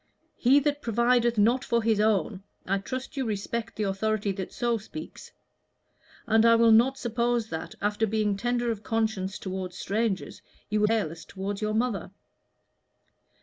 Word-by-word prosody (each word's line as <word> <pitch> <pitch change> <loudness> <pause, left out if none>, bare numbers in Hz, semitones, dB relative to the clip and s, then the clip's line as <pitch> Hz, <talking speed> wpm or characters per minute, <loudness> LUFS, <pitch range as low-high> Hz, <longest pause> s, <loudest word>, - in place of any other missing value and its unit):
'He 265 +4 +5
that 290 0 -1
provideth 235 0 +2
not 235 +5 +3
for 235 -1 0
his 220 -2 +2
own 210 -2 +1
' - - -43
I 195 +1 0
trust 255 +7 -6
you 270 - 0
respect 220 +1 -3
the 215 - -2
authority 205 +1 0
that 190 -1 -5
so 235 -1 0
speaks. 310 +9 -10 0.9
And 220 0 +4
I 230 0 +6
will 230 0 +5
not 245 +5 +5
suppose 235 -2 -1
that, 160 +1 -5
after 210 +2 +1
being 210 -1 0
tender 240 +2 0
of 215 -2 -5
conscience 215 -4 -1
toward 185 -1 -5
strangers, 205 0 -2 0.3
you 210 - +2
will 210 - +4
be 225 - +2
careless 165 -7 -3
toward 195 +3 -5
your 215 0 -1
mother. 220 -7 -1
220 Hz, 165 wpm, -27 LUFS, 200-235 Hz, 0.9 s, I